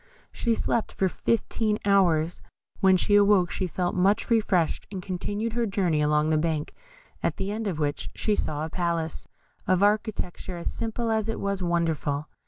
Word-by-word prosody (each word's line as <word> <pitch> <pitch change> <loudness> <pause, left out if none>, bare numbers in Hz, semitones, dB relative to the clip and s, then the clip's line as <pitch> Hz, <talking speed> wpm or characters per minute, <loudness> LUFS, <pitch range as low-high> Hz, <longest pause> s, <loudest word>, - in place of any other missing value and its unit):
She 235 -1 0
slept 230 - -1
for 190 - +1
fifteen 215 +2 0
hours. 175 -5 +3 0.4
When 190 -1 +5
she 205 - 0
awoke 200 -4 +5
she 185 +3 -2
felt 175 +1 -2
much 200 +6 +2
refreshed, 195 -7 +1
and 195 - -4
continued 205 +4 -3
her 235 -1 0
journey 180 -6 +1
along 150 +1 +2
the 155 - +3
bank, 155 -2 -1 0.5
at - - -1
the 195 +1 -2
end 220 +1 -3
of 180 -6 -2
which 145 -1 -2
she 215 - +1
saw 150 -5 -2
a - - -6
palace, 170 -3 -2 0.4
of 185 +1 +3
architecture 205 -4 -1
as 170 - -4
simple 230 0 -2
as 220 0 0
it 225 - -3
was 200 -1 -2
wonderful. 165 -4 0
185 Hz, 175 wpm, -26 LUFS, 165-210 Hz, 0.5 s, When